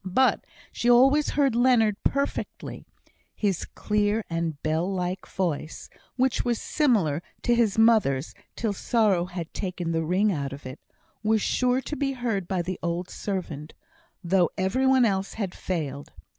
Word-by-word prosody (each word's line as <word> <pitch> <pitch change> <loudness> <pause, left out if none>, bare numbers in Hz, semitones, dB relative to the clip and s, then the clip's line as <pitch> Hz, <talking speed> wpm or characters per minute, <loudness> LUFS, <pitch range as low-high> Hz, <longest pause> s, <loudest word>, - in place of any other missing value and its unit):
But 190 +8 +2 0.3
she 240 - 0
always 270 +5 +5
heard 275 -4 +3
Leonard 235 -4 +4
perfectly. 280 +1 -3 0.5
His 195 -5 -1
clear 210 +1 0
and 165 -3 -2
bell 160 +4 0
like 185 0 -3
voice, 165 -4 -3 0.2
which 260 -1 +1
was 240 -2 0
similar 200 - +1 0.2
to 240 - +3
his 225 -3 +2
mother's, 215 - +3 0.2
till 220 -3 -1
sorrow 200 -4 +2
had 175 -2 -7
taken 180 -3 -3
the 165 0 0
ring 190 +6 +2
out 140 -5 -3
of 140 0 -10
it, 130 +2 -8 0.4
was 220 0 +2
sure 250 +1 +1
to 295 - -5
be 280 -2 -1
heard 225 -8 -2
by 180 -2 -1
the 185 +1 -4
old 175 +1 -3
servant, 165 -7 -5 0.5
though 180 -1 +3
every 200 +8 +1
one 260 -2 +5
else 195 -2 -1
had 200 -5 -3
failed. 145 -6 -4
195 Hz, 155 wpm, -26 LUFS, 170-235 Hz, 0.5 s, always